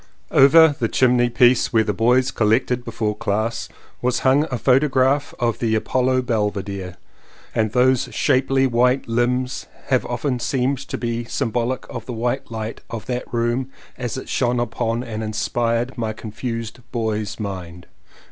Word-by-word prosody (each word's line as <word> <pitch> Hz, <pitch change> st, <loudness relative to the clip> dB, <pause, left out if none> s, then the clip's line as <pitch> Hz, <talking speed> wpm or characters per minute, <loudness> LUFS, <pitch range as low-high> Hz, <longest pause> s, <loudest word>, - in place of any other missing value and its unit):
Over 155 Hz, +2 st, +7 dB
the 115 Hz, -, +1 dB
chimney 120 Hz, 0 st, +3 dB
piece 120 Hz, +1 st, +4 dB
where 110 Hz, -1 st, +4 dB
the 105 Hz, -, -1 dB
boys 125 Hz, +4 st, +3 dB
collected 120 Hz, +3 st, +1 dB
before 110 Hz, -3 st, -2 dB
class 110 Hz, +1 st, -2 dB, 0.3 s
was 125 Hz, 0 st, 0 dB
hung 135 Hz, +3 st, +4 dB
a 125 Hz, -, -2 dB
photograph 135 Hz, +2 st, +2 dB
of 120 Hz, -3 st, -1 dB
the 110 Hz, -2 st, +1 dB
Apollo 130 Hz, +3 st, +1 dB
Belvedere, 100 Hz, -5 st, -2 dB, 0.6 s
and 110 Hz, -1 st, +1 dB
those 125 Hz, +1 st, +3 dB
shapely 135 Hz, +1 st, +2 dB
white 125 Hz, +1 st, +2 dB
limbs 125 Hz, +3 st, -1 dB, 0.2 s
have 130 Hz, -2 st, +3 dB
often 125 Hz, +1 st, -2 dB
seemed 130 Hz, +2 st, 0 dB
to 135 Hz, -, -5 dB
be 120 Hz, 0 st, -2 dB
sym 115 Hz, 0 st, -2 dB
bolic 120 Hz, +2 st, -1 dB
of 115 Hz, -2 st, -7 dB
the 125 Hz, -, -4 dB
white 120 Hz, +3 st, -2 dB
light 110 Hz, -1 st, -5 dB
of 115 Hz, -2 st, -6 dB
that 125 Hz, -1 st, -4 dB
room 120 Hz, +2 st, 0 dB, 0.3 s
as 125 Hz, 0 st, -4 dB
it 130 Hz, -, -7 dB
shone 125 Hz, -1 st, 0 dB
upon 115 Hz, 0 st, -1 dB
and 110 Hz, -3 st, -5 dB
inspired 115 Hz, +3 st, -1 dB
my 110 Hz, -2 st, -1 dB
confused 115 Hz, +2 st, -5 dB
boy's 110 Hz, -3 st, -2 dB
mind. 90 Hz, -4 st, -6 dB
120 Hz, 155 wpm, -21 LUFS, 110-130 Hz, 0.6 s, Over